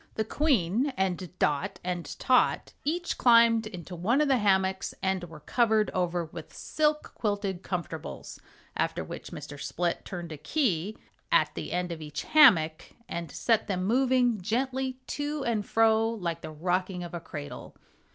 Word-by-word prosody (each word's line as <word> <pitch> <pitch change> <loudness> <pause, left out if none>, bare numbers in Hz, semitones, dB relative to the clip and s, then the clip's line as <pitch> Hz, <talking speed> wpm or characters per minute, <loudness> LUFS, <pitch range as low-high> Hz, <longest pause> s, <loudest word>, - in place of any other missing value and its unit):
The 220 - 0
Queen 245 - +1
and 185 -2 -1
Dot 145 -5 0
and 175 -4 -4
Tot 255 -1 +2
each 345 +4 -2
climbed 230 -2 +5
into 180 -3 -8
one 215 - +1
of 300 -1 +2
the 265 -2 +4
hammocks 190 -2 +1
and 190 -1 0
were 160 -3 -12
covered 220 - +2
over 175 -1 -1
with 160 - -10
silk 300 0 0
quilted 200 -4 -2
comfortables, 180 -4 -5 0.4
after - - -1
which - - -8
Mr. 145 -1 -8
Split 175 0 -2
turned 175 -3 -6
a 155 - -6
key 210 - 0 0.3
at - - +3
the - - -5
end 180 0 -1
of 165 -1 -6
each 150 -1 -5
hammock 180 - +5 0.2
and 170 -2 -5
set 225 +6 +1
them 185 -3 -1
moving 245 -1 +2
gently 255 +5 -1
to 290 0 -3
and 215 -3 -1
fro 225 0 +3
like 175 -7 -3
the 155 - -6
rocking 180 +3 -1
of 175 - -8
a 175 - -3
cradle. 145 -3 -8
190 Hz, 160 wpm, -28 LUFS, 175-235 Hz, 0.4 s, climbed